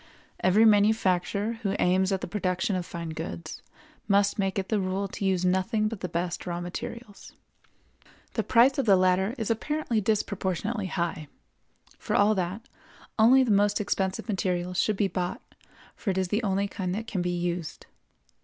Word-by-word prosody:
Every 205 +5 +4
manufacturer 205 0 +2
who 200 -2 -1
aims 185 +2 +2
at 190 - 0
the - - -4
production 185 +1 -1
of 180 -1 -3
fine 170 -1 -6
goods 160 0 -6 0.5
must 200 0 +2
make 195 -1 0
it 190 -1 -2
the 215 - +1
rule 190 +1 -1
to 195 - -7
use 185 -2 +1
nothing 190 +4 +1
but 220 -2 -5
the 180 - -4
best 175 +2 -3
raw 175 -1 -2
materials. 205 +5 -7 1.0
The - - 0
price 255 +3 +4
of 265 - 0
the 195 - +7
latter 185 +4 +2
is 225 -2 -1
apparently 240 -1 -1
disproportionately 205 0 -1
high; 170 -2 -3 0.7
for - - -2
all 205 +2 +4
that, 190 +3 -3 0.5
only 255 +4 +6
the 240 - 0
most 205 0 +3
expensive 190 -1 -1
materials 180 -3 -1
should 215 -2 0
be 200 - +2
bought, 180 -1 -3 0.5
for 210 - -4
it 190 - 0
is 185 -1 0
the 210 +4 0
only 200 -2 0
kind 185 -2 -3
that 225 +2 -4
can 200 -5 -3
be 180 - -1
used. 175 -2 -3
195 Hz, 170 wpm, -27 LUFS, 180-215 Hz, 1.0 s, the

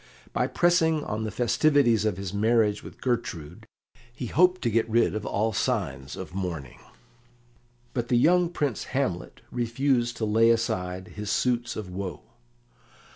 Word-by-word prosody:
By - - +1
pressing 160 -3 +2
on 110 -3 -3
the - - -2
festivities 120 0 +3
of 105 -4 0
his 95 -1 -5
marriage 105 0 +2
with - - -12
Gertrude, 115 - -3 0.4
he 125 +1 -6
hoped 180 +9 +3
to 120 - +1
get 115 +1 +1
rid 115 +1 +3
of 110 -1 -4
all 110 +2 0
signs 70 -7 -2
of - - -8
mourning. 85 -9 -5 1.1
But 120 -2 -2
the 120 - +3
young 175 +6 +4
Prince 145 -9 -2
Hamlet 90 -11 -2
refused 120 0 0
to 110 - -1
lay 110 +2 +4
aside 90 -5 -1
his 105 -1 -6
suits 120 +2 0
of 100 -4 -6
woe. 95 -1 -5
115 Hz, 150 wpm, -26 LUFS, 100-125 Hz, 1.1 s, young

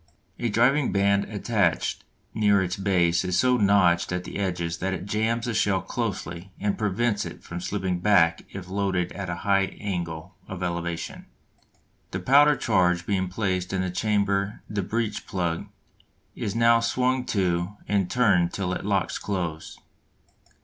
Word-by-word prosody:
A 120 - 0
driving 125 +6 +3
band 100 0 +2
attached 105 -4 0 0.3
near 100 -3 +3
its 90 0 -2
base 90 -3 +2
is 90 -1 0
so 125 -1 +3
notched 100 -6 +3
at 90 0 -2
the - - -6
edges 85 -4 -2
that 95 0 -1
it 95 - -7
jams 110 +3 0
the 120 - -2
shell 100 -3 +2
closely 95 -4 -4
and 100 0 0
prevents 105 +1 0
it - - -9 0.2
slipping 95 -2 -2
back 90 -4 +4
if 95 -2 -8
loaded 95 -2 -1
at 100 -2 -5
a 85 - -2
high 100 -1 +2
angle 90 -3 -4
of 90 -1 -6
elevation. 85 -1 -4 0.8
The - - -4
powder 145 +3 +5
charge 90 -7 +1
being 95 -2 0
placed 95 -1 -2
in 95 -1 0
the 90 - -2
chamber 100 0 0
the 105 -1 -2
breech 110 +2 -3
plug 85 -3 -2 0.7
is 100 - -3
now 115 0 +5
swung 125 +2 +1
to 90 0 -1
and 100 -3 +1
turned 100 -9 +3
till 95 -2 -2
it - - -4
locks 100 -2 0
close. 85 -6 -4
95 Hz, 155 wpm, -25 LUFS, 90-105 Hz, 0.8 s, powder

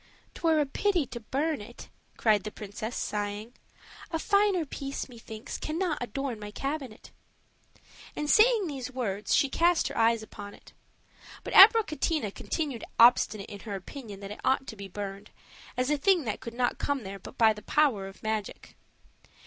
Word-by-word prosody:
"'Twere 325 -2 +2
a 295 - +3
pity 350 +3 +1
to 240 -1 -7
burn 285 +5 -1
it," 235 +4 -11 0.3
cried 215 -4 +3
the 215 - -4
princess, 215 +3 -6
sighing; 210 +2 -3 0.6
"a 325 - -1
finer 400 -1 +2
piece, 275 0 -5
methinks, 225 -3 -8
cannot 325 0 -2
adorn 245 0 -3
my 210 0 -7
cabinet." 270 0 -5 1.0
And 300 - -3
saying 435 +4 +5
these 270 -5 -5
words, 210 -6 -1
she 280 - +4
cast 340 +5 +2
her - - -7
eyes 225 0 +3
upon 205 -1 -10
it. - - -18 0.7
But - - -6
Abricotina 310 - +6
continued 285 -8 -3
obstinate 230 -3 +5
in 200 - -8
her 205 -1 -6
opinion 205 0 -9
that 200 0 -7
it 210 - -8
ought 265 0 +2
to 220 - -7
be 200 -1 -8
burned, 195 +1 -7 0.5
as 255 +3 +1
a 295 - +1
thing 365 +1 +3
that 215 -4 -3
could 235 -2 -8
not 245 0 0
come 280 -4 -1
there 195 0 -7
but 225 - -12
by 225 -2 +5
the 210 - -11
power 230 -6 +2
of 195 - -13
magic. 215 -1 -4
245 Hz, 170 wpm, -28 LUFS, 210-300 Hz, 1.0 s, Abricotina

